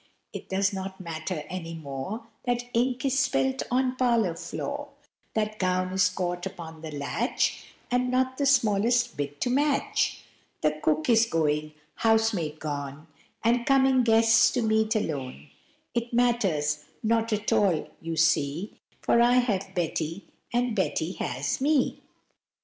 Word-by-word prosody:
It - - -8
does 190 +1 +1
not 190 0 -5
matter 165 -2 -4
any 165 -2 -6
more 155 - -6 0.2
That 245 -1 0
ink 250 +2 +1
is 270 0 +2
spilt 265 -1 +1
on 255 +1 +1
parlor 235 -8 +2
floor, 285 +12 -5 0.5
That 215 -1 -1
gown 185 0 0
is 185 -1 +4
caught 180 0 -3
upon 160 -4 -9
the 160 - -6
latch, 150 - -1 0.3
And 250 0 +1
not 260 +1 0
the 280 - +2
smallest 240 -1 +3
bit 145 0 -4
to 245 - +1
match, 295 +10 +1 0.4
That 155 0 0
cook 155 0 +1
is 230 -1 +5
going, 155 -4 0 0.2
housemaid 220 -9 +1
gone, 145 0 -5 0.4
And 235 +2 +3
coming 265 -1 +4
guests 225 0 +5
to 245 - 0
meet 220 0 +2
alone; 135 - -3 0.4
It 235 0 -2
matters 190 -12 +1 0.2
not 225 +1 +1
at 210 0 0
all, 185 -7 +2
you 165 0 -4
see, 155 +3 +1 0.2
For 235 - +3
I 240 +1 +5
have 200 -6 +1
Betty, 165 +1 -2 0.3
and 245 -1 0
Betty - - 0
has - - -3
me. 285 -1 +2
210 Hz, 145 wpm, -27 LUFS, 165-245 Hz, 0.5 s, is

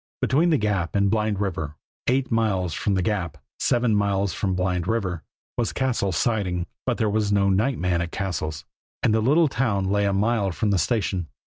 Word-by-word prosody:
Between 155 +7 +2
the 155 - +4
Gap 100 -7 -1
and 100 -1 +3
Blind 110 -2 0
River, 80 -7 -3 0.3
eight 130 +1 +1
miles 100 -7 +1
from 100 +5 0
the 95 - +1
Gap, 85 -6 -2 0.2
seven 120 -2 +2
miles 100 -2 +1
from 95 -3 -1
Blind 90 -1 -1
River, 95 -7 -1 0.4
was 120 - 0
Cassil's 115 -9 0
Siding. 95 -7 0 0.2
But 125 - +1
there 110 - +1
was 105 0 0
no 100 -1 +3
night 110 +7 +1
man 90 -1 0
at 85 0 -4
Cassil's, 80 -5 -3 0.4
and 110 - +3
the 110 - +2
little 150 +8 +4
town 115 -8 0
lay 100 0 +2
a 100 - +2
mile 105 0 +1
from 105 +4 0
the 95 - +2
station. 90 -2 0
100 Hz, 195 wpm, -24 LUFS, 90-115 Hz, 0.4 s, the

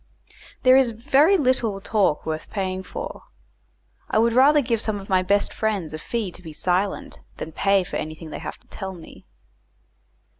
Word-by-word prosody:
There 255 0 +7
is 265 -2 +5
very 275 - +3
little 250 - +1
talk 195 -6 +1
worth 155 0 -4
paying 190 -2 -2
for. - - -7 0.8
I - - +1
would 230 +1 +3
rather 280 +5 +6
give 230 -5 0
some 215 -3 -1
of 195 - -11
my 185 -1 +4
best 200 +2 +1
friends 200 -8 -2
a 155 - -5
fee 220 +1 -3
to 175 - -12
be 160 -3 -9
silent, 185 +5 -1 0.2
than 160 - -6
pay 195 +3 +2
for - - -4
anything 155 +1 -6
they - - -5
have - - -6
to - - -29
tell 190 0 -6
me. 165 -2 -14
200 Hz, 180 wpm, -23 LUFS, 180-235 Hz, 0.8 s, There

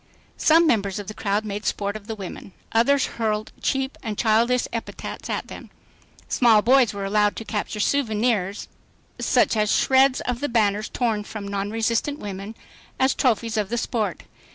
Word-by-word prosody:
Some 330 +2 +5
members 200 - +1
of 205 - -5
the 215 - -5
crowd 210 0 -1
made 205 0 -4
sport 200 0 -2
of 215 -1 -9
the 225 - -4
women. 195 -1 -8 0.2
Others 260 +5 +3 0.2
hurled 215 -1 -1
cheap 270 0 -1
and 215 -4 -4
childish 235 +2 +2
epithets 230 - -6
at - - -2
them. - - -10 0.6
Small 225 -4 +4
boys 255 -2 +5
were 200 -1 -5
allowed 210 +1 +2
to 225 - -7
capture 210 0 -3
souvenirs, 215 -5 0 0.5
shreds 260 +5 +3
of 245 -1 -3
the 290 - -2
banners 215 -2 +1
torn 225 -4 -1
from 205 -1 -7
non 200 0 -2
resistant 225 +6 0
women, 200 -1 -7 0.4
as 265 0 +3
trophies 230 -3 0
of 205 -2 0
the 240 - -1
sport. 220 -6 -2
220 Hz, 160 wpm, -23 LUFS, 205-245 Hz, 0.6 s, Some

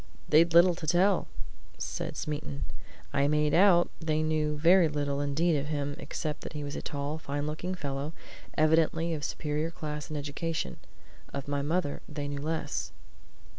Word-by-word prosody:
"They'd 165 +3 +5
little 175 +1 +8
to 165 -2 -7
tell," 180 +4 +3 0.5
said - - -4
Smeaton. 75 - -3 0.5
"I 140 0 +3
made 150 0 +2
out 175 -1 +6
they 155 -1 0
knew 155 -1 0
very 170 +3 +6
little 145 -1 -1
indeed 155 +4 +2
of 145 0 -1
him, 145 -2 -2
except 150 -1 -4
that - - -7
he 150 -1 -4
was 145 0 -5
a - - -3
tall, 145 +1 -3
fine 145 -1 -3
looking 165 +5 -3
fellow, 140 -1 -3 0.4
evidently 160 +1 +3
of 155 - -3
a - - -2
superior 150 +2 -2
class 150 -2 -5
and 155 - -3
education. 150 +3 -3 0.5
Of 140 0 -5
my 145 0 0
mother 150 0 -1
they 145 -1 -4
knew 145 0 -4
less." 160 +2 -2
150 Hz, 170 wpm, -30 LUFS, 145-165 Hz, 0.5 s, little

